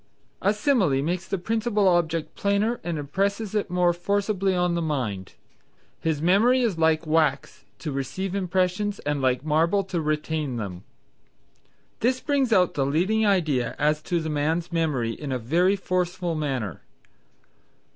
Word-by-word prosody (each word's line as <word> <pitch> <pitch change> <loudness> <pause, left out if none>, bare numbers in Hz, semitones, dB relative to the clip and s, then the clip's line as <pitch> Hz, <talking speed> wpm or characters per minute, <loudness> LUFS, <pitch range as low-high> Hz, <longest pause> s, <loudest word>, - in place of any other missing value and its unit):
A 200 - +3
simile 210 - +2
makes 175 +2 -2
the 195 - -1
principal 215 +1 0
object 165 -3 +1
plainer 205 +4 0
and 170 -1 -3
impresses 195 +8 -2
it 210 -2 -1
more 180 -1 +2
forcibly 195 +1 0
on 180 -1 +1
the 170 - 0
mind. 120 - -3 0.7
"His 160 -2 -1
memory 225 +9 +4
is 205 -8 0
like 160 0 +2
wax 155 -3 0
to 155 - -5
receive 160 +8 -3
impressions 190 +1 0
and 145 -1 -2
like 130 +1 +1
marble 165 +6 +2
to 180 -3 -3
retain 155 -2 -2
them." 95 -6 -5 1.2
This 255 +3 +1
brings 275 -4 0
out 180 -5 +4
the 140 - 0
leading 190 +10 +1
idea 155 -11 +1
as 150 +1 +1
to 175 -2 +2
the 160 - -4
man's 160 +4 -1
memory 150 -9 0
in 140 +3 -6
a 130 - 0
very 170 - +2
forceful 180 -2 -1
manner. 135 - -3
175 Hz, 150 wpm, -25 LUFS, 150-195 Hz, 1.2 s, memory